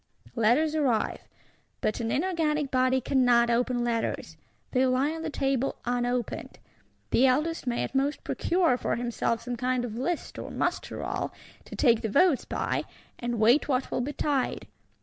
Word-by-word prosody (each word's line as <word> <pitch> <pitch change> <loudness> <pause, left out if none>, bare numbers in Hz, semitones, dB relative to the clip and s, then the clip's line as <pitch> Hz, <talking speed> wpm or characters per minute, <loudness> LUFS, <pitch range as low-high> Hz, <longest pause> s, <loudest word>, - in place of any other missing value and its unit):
Letters 250 +7 +3
arrive; 270 -8 0 0.5
but 215 - -1
an 230 -1 -2
inorganic 305 -3 0
body 255 0 +2
cannot 245 -2 +3
open 245 +1 +1
letters; 235 -1 -2 0.4
they 255 0 +3
lie 260 +4 +2
on 325 0 -5
the 320 - -3
table 270 -2 0
unopened. 245 0 -2 0.5
The 265 - +5
Eldest 305 +3 0
may 240 -1 0
at - - -5
most 275 +2 0
procure 340 -8 +1
for - - -1
himself 235 -1 -1
some 245 0 -4
kind 250 0 0
of 220 -3 -6
List 335 +5 -3
or - - -6
Muster - - -2
roll, - - -3 0.3
to - - -9
take 235 -5 +4
the 220 - -2
votes 290 - +3
by, - - -2 0.3
and 240 -1 -2
wait 235 +7 +4
what 260 -2 0
will - - 0
betide. 285 0 -1
255 Hz, 160 wpm, -27 LUFS, 240-290 Hz, 0.5 s, The